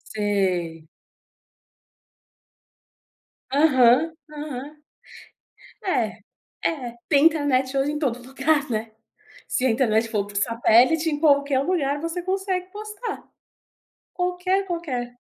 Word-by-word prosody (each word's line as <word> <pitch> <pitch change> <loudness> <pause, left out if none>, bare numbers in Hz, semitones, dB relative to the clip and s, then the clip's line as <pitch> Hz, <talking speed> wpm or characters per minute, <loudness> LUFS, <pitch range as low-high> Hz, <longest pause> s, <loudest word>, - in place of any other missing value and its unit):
Sei. 185 -6 -1 2.6
Aham, 275 +1 +4 0.2
aham. 295 -1 -7 1.1
É, - - 0 0.5
é, 250 -7 -2
tem 285 -1 +4
internet 285 -5 +2
hoje 275 +2 +1
em 300 - -3
todo 245 -4 -2
lugar, 280 +2 0
né? 220 -1 -3 0.6
Se 255 - 0
a - - +3
internet 225 -1 +2
for 210 -3 -1
por 205 0 -10
satélite, 240 +9 +3
em 295 - -2
qualquer 285 -3 +3
lugar 285 -3 0
você 330 +2 -3
consegue 375 0 -2
postar. 425 +3 -7 0.9
Qualquer, 360 +2 0
qualquer. 260 -9 -4
280 Hz, 100 wpm, -24 LUFS, 240-330 Hz, 2.6 s, Aham